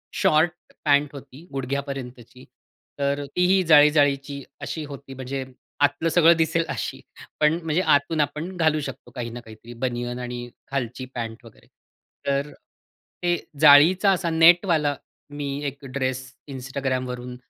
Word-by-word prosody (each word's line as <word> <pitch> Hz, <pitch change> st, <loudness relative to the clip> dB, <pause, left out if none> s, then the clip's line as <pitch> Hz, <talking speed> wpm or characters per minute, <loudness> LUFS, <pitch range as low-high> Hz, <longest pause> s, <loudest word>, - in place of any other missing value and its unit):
Short 155 Hz, +3 st, +3 dB, 0.3 s
pant 145 Hz, -1 st, +3 dB
होती 140 Hz, +3 st, -12 dB
गुडघ्यापर्यंतची 135 Hz, -2 st, -5 dB, 0.6 s
तर 140 Hz, +1 st, 0 dB
तीही 185 Hz, +1 st, +4 dB
जाळी 150 Hz, -3 st, +7 dB
जाळीची 140 Hz, -2 st, +1 dB, 0.2 s
अशी 160 Hz, -, -4 dB
होती 140 Hz, -1 st, -10 dB
म्हणजे 130 Hz, +1 st, -5 dB, 0.4 s
आतलं 145 Hz, +4 st, -1 dB
सगळं 170 Hz, +1 st, +5 dB
दिसेल 165 Hz, +1 st, +1 dB
अशी -, -, -4 dB, 0.4 s
पण 155 Hz, +2 st, +3 dB
म्हणजे 160 Hz, +3 st, +1 dB
आतून 155 Hz, +3 st, -1 dB
आपण 150 Hz, +6 st, -3 dB
घालू 160 Hz, -2 st, +2 dB
शकतो -, -, -8 dB
काही 120 Hz, -2 st, -4 dB
ना 120 Hz, -, -7 dB
काहीतरी 115 Hz, 0 st, -13 dB
बनियन 120 Hz, 0 st, -3 dB
आणि 120 Hz, 0 st, -6 dB, 0.2 s
खालची 130 Hz, -1 st, -3 dB
पॅन्ट 115 Hz, -1 st, -6 dB
वगैरे. 115 Hz, -, -17 dB, 0.6 s
तर 140 Hz, +1 st, 0 dB, 0.7 s
ते 175 Hz, 0 st, +2 dB, 0.3 s
जाळीचा 160 Hz, +7 st, +7 dB
असा 175 Hz, -2 st, 0 dB
नेटवाला 165 Hz, -2 st, +4 dB, 0.3 s
मी 145 Hz, -1 st, -5 dB, 0.2 s
एक 140 Hz, 0 st, -7 dB
ड्रेस 130 Hz, -1 st, -2 dB, 0.3 s
Instagramवरून 130 Hz, -2 st, -4 dB
140 Hz, 130 wpm, -24 LUFS, 130-155 Hz, 0.7 s, जाळी